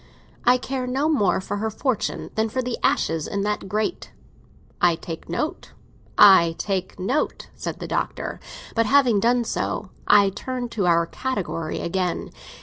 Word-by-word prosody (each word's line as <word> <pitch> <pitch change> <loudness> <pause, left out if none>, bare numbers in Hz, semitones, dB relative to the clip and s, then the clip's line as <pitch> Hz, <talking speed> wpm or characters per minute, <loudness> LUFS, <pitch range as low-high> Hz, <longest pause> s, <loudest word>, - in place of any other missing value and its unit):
I 245 +1 +6
care 255 0 -4
no 270 +4 0
more 210 - +2
for 195 +2 -4
her 220 +2 -1
fortune 245 +1 -2
than 220 0 0
for 255 +3 -2
the 245 -1 -2
ashes 160 -2 +1
in 200 -2 -2
that 210 -2 -2
grate." 215 - -2 0.7
"I 175 -1 +5
take 165 0 -8
note—I 185 - +3
take 190 -1 -3
note," 250 +11 -1
said - - -5
the - - -6
Doctor. - - -3 0.3
"But 230 -1 +2
having 255 -5 +4
done 240 +3 +3
so, 210 -3 -3 0.2
I 200 -1 +6
turn 245 +4 -4
to 210 -5 -1
our 170 -1 +4
category 170 -7 -3
again. 180 0 -2
210 Hz, 150 wpm, -23 LUFS, 185-250 Hz, 0.7 s, I